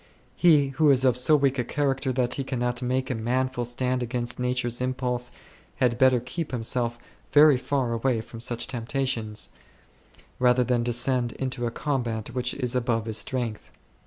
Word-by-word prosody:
He 150 -6 +4
who 150 +3 +2
is 135 -1 +5
of 125 -3 +4
so 125 +5 +4
weak 140 -2 +1
a - - +1
character 135 +1 -1
that 125 -1 0
he 135 - -2
cannot 125 -2 -2
make 130 +1 -1
a - - +1
manful 125 +2 -1
stand 125 +1 -1
against 120 0 -3
nature's 125 -1 -1
impulse 125 -1 -1 0.4
had 120 -2 +1
better8 130 -2 +4
keep 165 +4 -4
himself 120 0 -1 0.3
very 150 -1 +7
far 130 -2 -1
away 115 0 0
from 115 +1 -11
such 120 0 -1
temptations, 120 -3 -2 0.9
rather 125 0 +4
than 125 -1 +1
descend 120 0 0
into 130 -2 -3
a - - 0
combat 120 -4 -2
which 125 -1 -2
is 125 -2 -2
above 115 -3 0
his 110 -1 0
strength. 120 -5 -3
125 Hz, 165 wpm, -26 LUFS, 120-130 Hz, 0.9 s, very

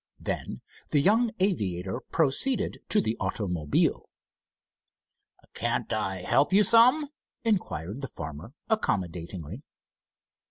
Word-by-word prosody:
Then - - -4 0.3
the 145 - +3
young 225 +10 +3
aviator 100 - -1
proceeded 165 - +1
to 210 - +5
the 110 - -1
automobile. 90 -6 -1 1.4
"Can't - - -1
I 95 -1 -2
help 140 - +2
you 200 +2 +5
some?" 250 +7 +6 0.3
inquired 130 - -2
the 135 - -4
farmer, 80 - -8
accommodatingly. 90 - -3
120 Hz, 95 wpm, -27 LUFS, -, 1.4 s, some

